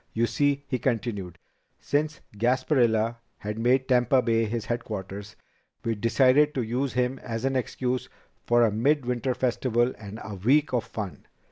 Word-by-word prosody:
You 115 +1 +2
see," 145 +2 +1
he 130 -2 -1
continued, 110 -8 -2 0.4
"since 150 +2 -1
Gasparilla 120 -1 +2 0.2
had 105 +2 -5
made 125 +3 +2
Tampa 125 0 +3
Bay 115 -1 +2
his 115 0 -3
headquarters, 105 -4 -5 0.5
we 115 - +1
decided 130 +7 +3
to 130 - 0
use 125 +4 -1
him 125 +1 0
as 115 +1 -4
an 135 0 0
excuse 125 0 -2 0.3
for 120 0 +4
a 110 - +2
mid 135 +6 +2
winter 125 +1 -1
festival 120 -1 +1
and 105 0 -8
a 110 -1 -7
week 135 +9 +3
of 120 -3 +1
fun. 105 -9 -7
120 Hz, 155 wpm, -26 LUFS, 110-130 Hz, 0.5 s, for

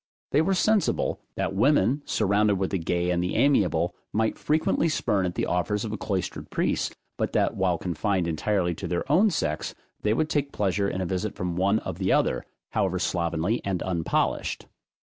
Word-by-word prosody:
They 145 - +4
were 190 +4 +2
sensible, 215 +2 +1 0.2
that - - -1
women, 125 +4 +3
surrounded 105 0 +2
with 95 0 -1
the 95 - 0
gay 85 +1 0
and 85 -1 +1
the 90 - -2
amiable, 90 - +3 0.2
might 110 +1 0
frequently 160 +2 +1
spurn 100 -10 +1
at 90 - -5
the - - 0
offers 105 +4 0
of 110 - -4
a - - -2
cloistered 95 -2 -3
priest, - - -1 0.2
but - - -1
that - - +2
while 90 -2 +1
confined 90 +1 -1
entirely 90 +2 0
to - - -6
their 85 - -1
own 195 +8 +5
sex, 75 - -2 0.3
they 105 +1 +2
would 155 +4 +1
take 145 -3 -1
pleasure 100 0 0
in 95 - -3
a - - -1
visit 95 +4 -2
from 90 -2 -3
one 100 +4 +2
of 95 -4 -5
the 95 -1 +1
other, - - +2 0.3
however - - 0
slovenly 85 +6 0
and 95 -3 -1
unpolished. 85 -3 -1
95 Hz, 190 wpm, -26 LUFS, 90-110 Hz, 0.3 s, own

